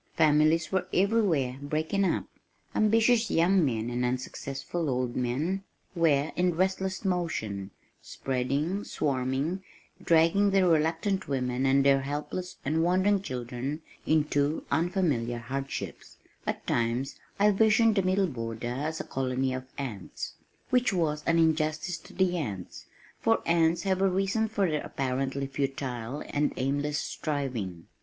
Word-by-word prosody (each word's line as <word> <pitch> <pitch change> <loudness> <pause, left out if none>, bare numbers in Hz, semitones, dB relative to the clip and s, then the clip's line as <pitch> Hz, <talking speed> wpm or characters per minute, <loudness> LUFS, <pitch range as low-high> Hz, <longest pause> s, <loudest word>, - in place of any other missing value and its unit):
Families 155 +1 +4
were 185 -1 0
everywhere 180 - +2
breaking 155 +7 0
up. - - 0 0.5
Ambitious 225 +2 +3
young 180 +2 +4
men 115 -4 -1
and 120 +1 -1
unsuccessful 135 +5 -3
old 125 -1 -1
men 145 +11 -1 0.3
were 155 -4 +2
in 180 -1 +2
restless 190 +2 -1
motion, 110 - -2 0.3
spreading, 140 +9 -2
swarming, 135 +6 -1 0.4
dragging 170 +5 +4
their 195 -2 +3
reluctant 165 +4 +1
women 130 -1 0
and 135 +1 +4
their 135 -1 +5
helpless 150 +6 -4
and 155 +3 +1
wondering 185 +3 +3
children 130 +1 -4 0.2
into 150 -1 +1
unfamiliar 150 -8 +1
hardships 135 +3 -5 0.3
At - - -2
times 120 +4 -1 0.2
I 210 +1 +5
visioned 220 +2 +4
the 195 - +3
Middle 190 +1 +2
Border 115 -5 -4
as 155 +4 -3
a - - -2
colony 130 0 -1
of 130 0 -4
ants 115 -9 -5 0.4
which 250 -2 +3
was 155 -5 0
an 165 - +4
injustice 160 +1 +1
to - - -15
the 180 -1 +2
ants, 100 - -5 0.3
for - - +2
ants 165 0 +3
have 190 -1 +1
a 195 - +4
reason 195 +4 +1
for 205 -3 +1
their 155 -2 -1
apparently 135 +1 -2
futile 135 -2 -3
and 145 +1 0
aimless 145 +3 0
striving. 125 - -3
150 Hz, 135 wpm, -28 LUFS, 130-185 Hz, 0.5 s, their